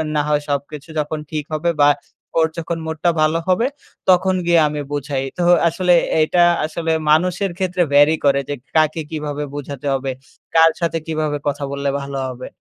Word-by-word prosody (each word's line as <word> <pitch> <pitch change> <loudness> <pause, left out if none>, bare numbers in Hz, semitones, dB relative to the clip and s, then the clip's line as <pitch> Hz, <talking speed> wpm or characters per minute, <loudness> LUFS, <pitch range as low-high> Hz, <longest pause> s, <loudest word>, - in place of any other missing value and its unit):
না 150 - +3
হয় 150 0 +2
সবকিছু 145 +2 -4
যখন 150 +1 -2
ঠিক 155 -1 -2
হবে 165 +3 +1
বা 145 - +7 0.5
ওর 160 - +4
যখন 170 0 -3
মুড 160 0 -4
টা 175 - +4
ভালো 155 +2 +2
হবে, 185 +7 +2 0.4
তখন 185 +1 +4
গিয়ে 170 -1 +4
আমি 150 0 -3
বুঝাই। 140 -2 -2
তো 175 - 0 0.2
আসলে 180 +2 +2 0.3
এইটা 175 +3 +3 0.2
আসলে 160 +1 -2 0.2
মানুষের 180 +4 +2
ক্ষেত্রে 185 -1 -1
vary 145 +2 +6
করে, 140 -1 +4
যে - - -1 0.2
কাকে 155 0 +2
কিভাবে 150 -2 -3
বোঝাতে 145 -1 -6
হবে? 135 0 -2 0.4
কার 165 0 +7
সাথে 165 -1 0
কিভাবে 155 -2 -1
কথা 145 0 -2
বললে 140 0 -2
ভালো 140 0 -5
হবে? 130 0 -7
155 Hz, 175 wpm, -19 LUFS, 145-170 Hz, 0.5 s, বা